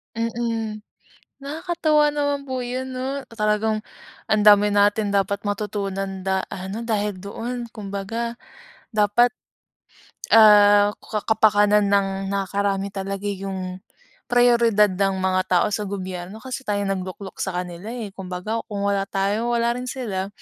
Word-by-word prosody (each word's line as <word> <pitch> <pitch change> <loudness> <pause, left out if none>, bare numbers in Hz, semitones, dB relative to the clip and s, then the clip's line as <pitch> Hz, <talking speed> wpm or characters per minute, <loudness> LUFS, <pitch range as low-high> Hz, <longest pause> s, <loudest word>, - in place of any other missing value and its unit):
Mm, 230 -1 -2 0.6
nakakatuwa 305 0 +1
naman 285 -1 -1
po 260 -2 -4
'yon, 255 +1 -4
'no? 265 +2 -3
Talagang 215 0 0 0.5
ang 210 -1 +2
dami 205 0 +7
natin 205 +1 +3
dapat 200 +1 0
matutunan 195 -2 -3
da 190 0 +1
ha, 190 0 -6
'no, 220 +4 -5
dahil 210 -3 -1
doon. 235 +6 -5
Kumbaga, 215 +3 -4 0.5
dapat, 215 +3 +3 1.1
ah, 205 -1 +7
ka 215 -2 -4
kapakanan 210 -1 +4
ng 200 -1 +3 0.2
nakakarami 200 0 -1
talaga 195 0 -5
yung 190 -2 -4 0.5
prayoridad 235 -4 +4
ng 195 +1 0
mga 185 0 +2
tao 180 +1 +3
sa 210 0 -2
gobyerno, 190 +2 -6
kasi 260 0 -6
tayong 205 -1 0
nagluklok 190 +1 -6
sa 190 -2 -2
kanila 175 +3 -9
eh. 230 -4 -5
Kumbaga, 190 +4 -4
kung 200 -1 -4
wala 200 -1 0
tayo 210 +5 0
wala 235 0 +2
rin 250 +1 -4
sila. 210 -8 -3
205 Hz, 130 wpm, -23 LUFS, 195-235 Hz, 1.1 s, dami